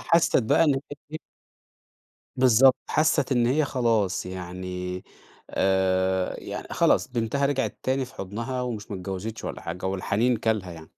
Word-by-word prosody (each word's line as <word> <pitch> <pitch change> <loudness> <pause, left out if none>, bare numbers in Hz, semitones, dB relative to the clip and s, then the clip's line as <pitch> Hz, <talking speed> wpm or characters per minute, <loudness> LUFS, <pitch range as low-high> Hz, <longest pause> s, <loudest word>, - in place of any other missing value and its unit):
حسّت 165 -7 +3
بقى 140 +8 +4
إن 145 - +3 0.4
هي 155 - -3 1.2
بالضبط 130 0 +6 0.2
حسّت 150 -3 +2
إن 120 -2 +3
هي 145 +5 +2
خلاص 115 -9 0
يعني 90 0 -5 0.5
آآ 95 -1 +1
يعن - - -6
خلاص - - +3
بنتها 125 +4 0
رجعت 140 -1 -1
تاني 130 +1 0
في 125 - -14
حضنها، 115 +7 -4
ومش 115 -3 -5
ما 100 - -3
اتجوزتش 95 +4 -5
ولا - - -5
حاجة 90 +3 -5
والحنين 100 +6 +1
كَلْها 110 -5 -1
يعني. 80 -1 -11
110 Hz, 140 wpm, -26 LUFS, 95-130 Hz, 1.2 s, بالضبط